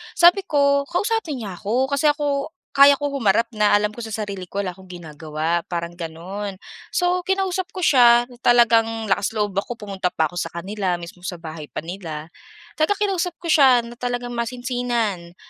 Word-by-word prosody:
sabi 355 +3 +5
ko, 280 -1 +2
"KLausapin 355 - -1
niya 190 -4 -7
ako." 250 +7 0
Kasi 280 +2 +2
ako, 295 +1 0 0.2
kaya 280 0 +7
ko 285 0 -3
humarap 230 +1 +2
na, 210 -2 +3
alam 210 0 +1
ko 215 - -11
sa 220 -2 -5
sarili 195 -3 -6
ko 200 +3 -3
wala 185 - -3
akong 190 +1 -16
ginagawa 160 -1 -3
parang, 170 -1 -3
gano'n. 175 +4 -6 0.4
So, 360 0 +2
kinausap 380 -1 0
ko 370 - -4
siya 240 -5 +6
na 240 - -15
talagang 225 -3 +3
lakas 200 +3 0
loob 210 -1 0
ako, 240 - -5
pumunta 200 -4 -3
pa 160 -2 0
ako 175 - -4
sa - - -2
kanila, 190 +1 -2
mismong 175 +1 -9
sa 180 - -4
bahay 160 -2 -8
pa - - -6
nila. 165 -3 -7 0.5
Talagang 405 +5 +1
kinausap 360 -2 -2
ko 335 - 0
siya 260 -6 +6
na 235 +1 -11
talagang 245 0 -3
masinsinan, 235 -6 -2
225 Hz, 180 wpm, -22 LUFS, 180-280 Hz, 0.5 s, kaya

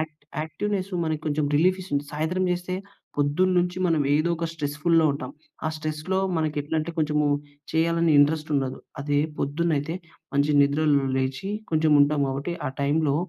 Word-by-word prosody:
Act 155 -1 -6 0.2
activeness 195 +4 -3
మనకి 155 -1 -1
కొంచెం 150 0 +1
రిలీఫీస్తుంది. 180 -4 +1
సాయంత్రం 160 +5 -1
చేస్తే 180 +1 -3 0.4
పొద్దున్నుంచి 175 +5 +2
మనం 165 -3 +2
ఏదో 155 +3 +2
ఒక 165 0 -2
స్ట్రెస్‌ఫు‌ల్‌లో 160 +2 +2
ఉంటాం. 135 -2 -5 0.4
ఆ - - +2
స్ట్రెస్‌లో 155 +4 -2 0.2
మనకెట్లంటే 155 +1 -1
కొంచెమూ 150 -1 +2 0.4
చేయాలని 165 0 +2
ఇంట్రెస్ట్ 155 +2 +3
ఉండదు. 135 -1 -2 0.2
అదే 145 0 +1 0.2
పొద్దున్న 160 +4 0
అయితే 155 +4 -3 0.4
మంచి 140 +1 +3
నిద్రలో 140 -1 +2
లేచి 130 +8 -2 0.2
కొంచెం 155 0 +3
ఉంటాం 145 0 +3
కాబట్టి 140 +6 -3
ఆ - - 0
టైమ్‌లో 145 0 +2
155 Hz, 140 wpm, -25 LUFS, 145-170 Hz, 0.4 s, ఇంట్రెస్ట్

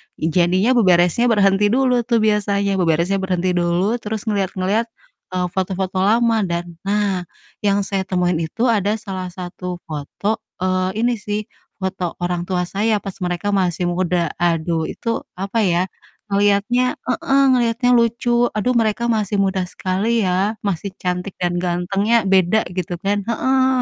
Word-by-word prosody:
I 160 +1 -2
Jadinya 185 +7 +3
beberesnya 185 -1 +4
berhenti 205 -2 +3
dulu 250 +2 +2
tuh 230 -3 +2
biasanya, 200 -2 +1
beberesnya 170 +3 +1
berhenti 185 -1 0
dulu, 180 +6 +1
terus 215 -1 -4
ngelihat-ngelihat, 200 +1 0 0.5
eee, 180 0 0
foto-foto 190 0 -2
lama 225 +3 +3
dan 170 -1 -4
nah, 200 -3 0 0.3
yang 200 -1 +1
saya 190 -1 -2
temuin 180 -2 +1
itu 165 +8 -3
ada 210 0 +1
salah 190 -4 -5
satu 180 0 -7
foto, 160 +8 -3 0.2
eee, 185 +4 0
ini 245 - +3
sih, 210 +1 -3 0.3
foto 190 -2 -3
orang 175 0 -2
tua 180 -1 0
saya 205 +4 0
pas 195 -2 -7
mereka 180 +2 -2
masih 180 -3 0
muda, 175 -2 0
aduh 165 -1 0
itu 230 - -5 0.3
apa 195 +5 -2
ya, 170 - +2 0.5
ngeliatnya 205 +5 +2
heeh, 270 +2 +2
ngeliatnya 240 0 +1
lucu, 235 +1 +2
"Aduh, 245 +4 +1
mereka 220 +1 0
masih 210 -2 0
muda 190 -1 0
sekali 200 +6 -1
ya, 190 +4 +1
masih 200 +1 -2
cantik 180 +1 -3
dan 175 -1 0
gantengnya 195 +6 +1
beda," 190 +3 +4
gitu 175 -1 -3
kan, 200 0 0
heeh. 260 +3 +1
195 Hz, 145 wpm, -20 LUFS, 180-220 Hz, 0.5 s, beberesnya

